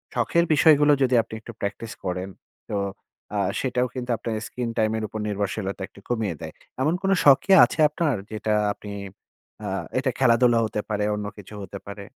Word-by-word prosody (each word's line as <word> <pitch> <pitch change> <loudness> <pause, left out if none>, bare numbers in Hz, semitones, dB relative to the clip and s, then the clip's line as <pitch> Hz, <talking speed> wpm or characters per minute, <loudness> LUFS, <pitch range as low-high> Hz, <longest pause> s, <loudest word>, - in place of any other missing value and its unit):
শখের 170 0 +2
বিষয়গুলো 150 0 +6
যদি 130 -1 +3
আপনি 110 - -14
একটু 120 - -9
প্র্যাকটিস 100 +3 -4
করেন, 90 +1 -2 0.4
তো 105 - -1 0.6
আ - - +1 0.2
সেটাও 125 -1 0
কিন্তু 125 -1 -5
আপনার 115 0 -3
স্ক্রিন 125 -2 -4
টাইম 110 0 +2
এর 110 - -3
উপর 110 - -6
নির্ভরশীলতা 100 -1 -3
একটু - - -17
কমিয়ে 110 -7 -1
দেয়। - - -7 0.3
এমন 150 +5 +2
কোন 195 - +2
শখ 140 -2 +8
কি 195 - 0
আছে - - -7
আপনার? 150 -2 0 0.2
যেটা 110 0 -1 0.2
আপনি 105 0 -10 0.7
আ - - -3 0.3
এটা 130 0 0
খেলাধুলা 120 -2 +4
হতে 110 -1 -2
পারে, 105 -1 0
অন্য 105 0 -4
কিছুও 105 +1 -9
হতে 100 +1 -8
পারে? 100 0 -7
110 Hz, 180 wpm, -24 LUFS, 105-130 Hz, 0.7 s, শখ